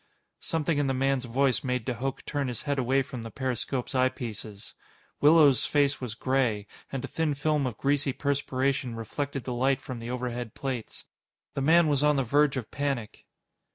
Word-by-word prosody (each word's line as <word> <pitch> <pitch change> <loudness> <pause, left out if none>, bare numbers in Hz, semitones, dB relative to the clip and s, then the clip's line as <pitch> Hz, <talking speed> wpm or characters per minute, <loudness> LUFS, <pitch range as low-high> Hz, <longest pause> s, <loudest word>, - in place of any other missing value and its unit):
Something 160 -2 0
in 145 - +1
the 135 - 0
man's 135 0 +1
voice 130 +2 +1
made 125 -3 -1
de 130 - -1
Hooch 130 +3 -4
turn 145 -2 -1
his 125 -3 -4
head 145 -2 -1
away 135 +2 +2
from 130 -2 -7
the 115 - -6
periscope's 130 +2 -2
eyepieces. 115 -5 -2 0.5
Willows' 145 -4 +6
face 145 -2 +2
was 120 -4 -4
gray, 125 -5 +1 0.3
and 135 -2 -3
a - - -6
thin 160 -3 -1
film 145 -1 +1
of 120 - -5
greasy 140 0 +1
perspiration 135 -2 -1
reflected 135 +4 -4
the 125 - -3
light 130 +2 +2
from 130 -2 -7
the 115 +1 -6
overhead 125 -2 -4
plates. 130 -5 -5 0.5
The 140 - -2
man 165 +4 +5
was 145 -1 +2
on 150 0 +4
the 135 - +2
verge 145 +3 +3
of 125 - -5
panic. 135 -6 -3
135 Hz, 185 wpm, -28 LUFS, 125-140 Hz, 0.5 s, Willows